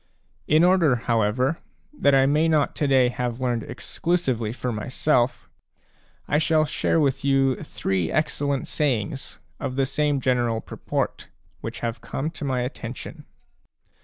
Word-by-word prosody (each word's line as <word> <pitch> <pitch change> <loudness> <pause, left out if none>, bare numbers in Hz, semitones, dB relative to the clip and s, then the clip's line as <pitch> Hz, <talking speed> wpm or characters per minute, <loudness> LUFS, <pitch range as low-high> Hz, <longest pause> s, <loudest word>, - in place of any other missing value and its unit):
In 155 +2 +5
order, 175 -7 +4
however, 120 +5 +1 0.3
that 140 - +3
I 135 0 +5
may 150 +4 +3
not 155 -3 +2
to 145 - +1
day 130 -2 +4
have 125 -1 -3
learned 120 -2 0
exclusively 125 -2 -2
for 125 +1 -3
myself, 125 +3 0 0.8
I 145 - +2
shall 155 0 +3
share 160 +2 +1
with 135 -3 +1
you 135 -2 +3
three 95 -4 -2
excellent 145 -3 0
sayings, 135 -3 -2 0.2
of 135 -3 -3
the 135 0 +2
same 145 +1 0
general 120 -3 +1
purport, - - -3 0.3
which - - -6
have 115 0 -3
come 150 +4 -3
to 160 - -8
my 130 -3 0
attention. 125 -1 -6
135 Hz, 140 wpm, -24 LUFS, 120-150 Hz, 0.8 s, In